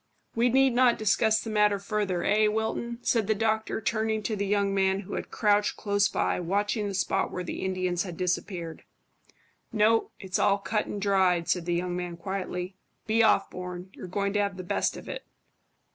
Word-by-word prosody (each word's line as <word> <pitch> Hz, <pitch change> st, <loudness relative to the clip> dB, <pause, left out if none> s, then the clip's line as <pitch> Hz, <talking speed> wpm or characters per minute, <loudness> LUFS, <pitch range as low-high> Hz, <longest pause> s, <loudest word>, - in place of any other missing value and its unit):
"We 235 Hz, +2 st, +2 dB
need 265 Hz, +1 st, +4 dB
not 245 Hz, -1 st, +4 dB
discuss 220 Hz, +1 st, +2 dB
the 225 Hz, -, -5 dB
matter 210 Hz, -1 st, +3 dB
further, 200 Hz, -3 st, -2 dB
eh, 215 Hz, +1 st, +3 dB
Wilton?" 220 Hz, +2 st, -2 dB
said 225 Hz, -4 st, +1 dB
the 220 Hz, -, +2 dB
doctor, 220 Hz, +1 st, 0 dB
turning 220 Hz, 0 st, -1 dB
to 215 Hz, -, -1 dB
the 200 Hz, 0 st, -2 dB
young 200 Hz, -1 st, +1 dB
man, 190 Hz, 0 st, +2 dB
who 205 Hz, 0 st, -9 dB
had -, -, -4 dB
crouched 210 Hz, -1 st, +1 dB
close 205 Hz, -1 st, +2 dB
by, -, -, 0 dB
watching 205 Hz, +4 st, -1 dB
the 200 Hz, -, -4 dB
spot 190 Hz, -, 0 dB
where 180 Hz, -, -4 dB
the 175 Hz, -, -5 dB
Indians 185 Hz, -2 st, -1 dB
had 175 Hz, -3 st, -5 dB
disappeared. 180 Hz, -2 st, -3 dB, 0.9 s
"No. 225 Hz, 0 st, +3 dB
It's 190 Hz, -2 st, -2 dB
all 200 Hz, 0 st, +3 dB
cut 210 Hz, +1 st, -2 dB
and 205 Hz, -, -4 dB
dried," 190 Hz, -4 st, +2 dB
said 180 Hz, -2 st, 0 dB
the 175 Hz, -, +1 dB
young 175 Hz, 0 st, -2 dB
man 175 Hz, -1 st, -4 dB
quietly. 185 Hz, 0 st, -4 dB, 0.3 s
"Be 225 Hz, +1 st, +2 dB
off, 215 Hz, -3 st, +3 dB
Bourne; 180 Hz, 0 st, -7 dB
you're -, -, -9 dB
going 200 Hz, +2 st, -1 dB
to 205 Hz, -, +2 dB
have 200 Hz, -2 st, -2 dB
the 185 Hz, -, -6 dB
best 175 Hz, -, -1 dB
of -, -, -11 dB
it." -, -, -6 dB
200 Hz, 195 wpm, -27 LUFS, 185-215 Hz, 0.9 s, need